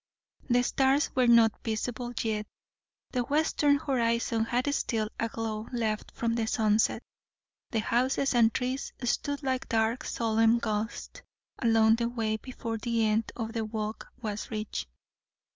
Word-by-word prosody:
The 245 0 +4
stars 270 +3 +2
were 255 -1 +4
not 230 -2 +5
visible 240 +2 -3
yet; 215 -2 -1 0.6
the 250 - 0
western 290 +1 +2
horizon 235 -5 0
had 250 +5 0
still 220 -6 -1
a 230 - 0
glow 220 -1 -4
left 220 -3 -2
from 230 -1 0
the 230 -1 -1
sunset; 215 0 +2 0.7
and 220 -3 0
houses 260 +4 +1
and 230 -2 +5
trees 255 +3 -2
stood 285 +4 -1
like 260 -1 -1
dark 225 +2 +1
solemn 225 0 +2
ghosts 220 - -3 0.4
along 225 -2 +4
the 235 0 0
way 220 -2 -1
before 230 -2 -5
the 230 0 +1
end 215 +1 +1
of 225 -1 -4
the 225 -2 -1
walk 215 0 -4
was 215 -3 -4
reached. 215 -1 -4
230 Hz, 145 wpm, -29 LUFS, 220-250 Hz, 0.7 s, not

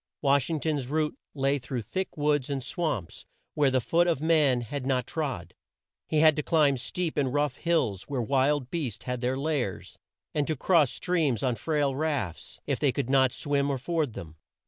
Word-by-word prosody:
Wash 140 0 +3
ing 160 -2 -1
ton's 145 -4 -1
route 150 +2 0 0.2
lay 140 0 +1
through 125 -2 -4
thick 185 - -4
woods 145 -2 +1
and 135 -2 -2
swamps 145 - -3 0.3
where 145 -2 +3
the 130 0 +2
foot 170 +8 +2
of 165 -6 +1
man 150 -5 +3
had 130 +4 -5
not 130 -1 0
trod; 130 - -4 0.5
he 155 -1 +2
had 155 -1 +6
to - - +1
climb 150 -2 +3
steep 165 +6 -3
and 135 -3 +1
rough 145 -3 0
hills 140 - 0
where 140 -3 -2
wild 135 +2 +1
beasts 140 -11 -3
had 125 -1 -3
their 130 +1 0
lairs; 140 -8 -3 0.3
and 150 -2 0
to 155 - 0
cross 155 -1 +3
streams 155 - 0
on 130 -2 +2
frail 145 +1 0
rafts, 135 - -3
if - - -1
they 145 -3 +3
could 130 -1 -2
not 130 -2 +4
swim 140 +1 0
or 140 - 0
ford 150 -1 -1
them. 80 -4 -9
140 Hz, 190 wpm, -28 LUFS, 125-155 Hz, 0.5 s, had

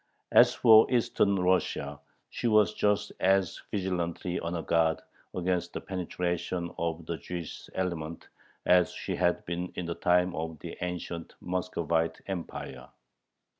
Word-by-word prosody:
As - - +6
for 110 +2 +7
Eastern 110 -4 +2
Russia, 90 0 0 0.3
she - - -2
was 105 -4 +4
just 105 0 +1
as 95 -1 +2
vigilantly 90 -2 -2
on 85 +1 -3
her 85 - -3
guard 80 -1 +2 0.4
against 90 0 -1
the - - -3
penetration 90 -1 -3
of 85 -1 -2
the 85 +1 -3
Jewish 85 -1 -7
element 85 -3 -3 0.4
as 90 -1 +5
she - - -4
had - - +1
been 90 +1 -3
in 90 - -3
the 85 - -2
time 90 +1 +2
of 80 0 -4
the - - -8
ancient 90 -1 -5
Muscovite 85 -3 -1
Empire. 80 -8 -6
90 Hz, 135 wpm, -29 LUFS, 85-95 Hz, 0.4 s, for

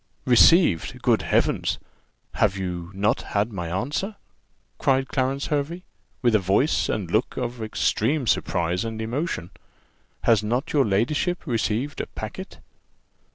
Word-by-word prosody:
"Received! 125 - +5
Good - - +3
Heavens! - - +1 0.6
have 100 -2 +1
not 95 +2 -1
you - - -13
had 105 +2 +1
my 90 -3 -4
answer?" 145 - -2 0.6
cried 135 0 +2
Clarence 135 +1 -1
Hervey, 155 +4 -2 0.4
with 120 -2 +4
a 110 - +5
voice 100 - +1
and 95 -6 -2
look 110 +6 0
of 120 -2 -3
extreme 115 +5 0
surprise 90 -3 0
and 110 -1 -5
emotion: 115 - -3 0.7
"Has 115 -3 +4
not 120 +8 -2
your 145 -3 +4
ladyship 145 - 0
received 120 +1 -1
a - - -6
packet?" - - -8
115 Hz, 130 wpm, -24 LUFS, 100-140 Hz, 0.7 s, Received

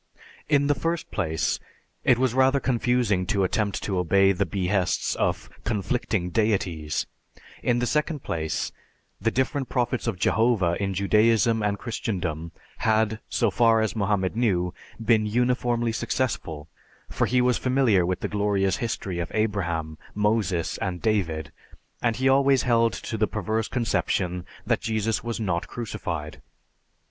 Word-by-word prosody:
_) - - -31 0.3
In 145 -2 +4
the 145 - +3
first 165 +4 -3
place, 80 -6 -1 0.4
it 125 - +4
was 130 -1 +1
rather 130 +1 +4
confusing 120 -7 +1
to 100 +1 +1
attempt 100 +1 -1
to 95 -3 -1
obey 95 +3 +4
the 95 - 0
behests 95 -2 0
of - - -1 0.2
conflicting 105 -3 -1
deities; 90 -7 0 0.6
in 120 -1 +2
the 120 - +1
second 150 +2 -1
place, 80 -1 -2 0.5
the 115 - +2
different 130 +2 -1
prophets 125 -1 -1
of - - -1
Jehovah 105 -4 +2
in 95 -1 -1
Judaism 110 +3 +3
and 105 -1 0
Christendom 90 -8 -3 0.3
had, 110 0 +1
so 115 -4 +1
far 115 0 +4
as 110 0 0
Mohammed 100 -2 0
knew, 90 -7 +1 0.3
been 110 -1 +3
uniformly 120 0 +1
successful, 85 - -2 0.4
for - - 0
he 125 - +2
was 125 0 +2
familiar 130 -8 +3
with 90 +1 -1
the - - -1
glorious 100 -2 +1
history 100 -6 -3
of 85 - -3
Abraham, 85 -8 -1 0.2
Moses, 105 -5 0
and 90 -2 -2
David, 85 -9 -1 0.5
and 115 -2 +1
he 130 +2 +1
always 135 0 +4
held 115 -2 +3
to 110 - -5
the 110 - +3
perverse 110 +2 -2
conception 90 -6 -1 0.2
that - - +1
Jesus 110 0 -1
was 115 -1 -3
not 95 -6 -1
crucified. 95 -10 -5
110 Hz, 145 wpm, -25 LUFS, 95-120 Hz, 0.6 s, In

